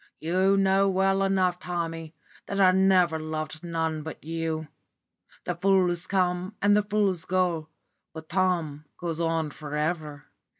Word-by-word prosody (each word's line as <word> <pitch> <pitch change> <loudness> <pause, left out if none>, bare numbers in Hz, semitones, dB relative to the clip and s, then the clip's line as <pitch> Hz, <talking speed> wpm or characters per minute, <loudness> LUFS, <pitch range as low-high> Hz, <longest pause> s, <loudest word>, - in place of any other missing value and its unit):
You 185 +4 +2
know 195 0 +3
well 195 +1 +2
enough, 185 -2 +1
Tommy, 165 -3 -4 0.3
that 200 - -3
I 185 -1 +6
never 185 -3 +3
loved 155 +1 -5
none 160 -2 -2
but 160 0 -8
you. 160 0 -3 0.8
The 180 - -1
fools 180 -1 +1
come 185 +1 0
and 205 0 +4
the 210 - +4
fools 205 -4 0
go, 175 -4 0 0.4
but 160 0 -10
Tom 170 -6 0
goes 170 -2 -3
on 165 -2 0
for 150 -1 -7
ever. 150 -2 -3
175 Hz, 140 wpm, -26 LUFS, 160-190 Hz, 0.8 s, I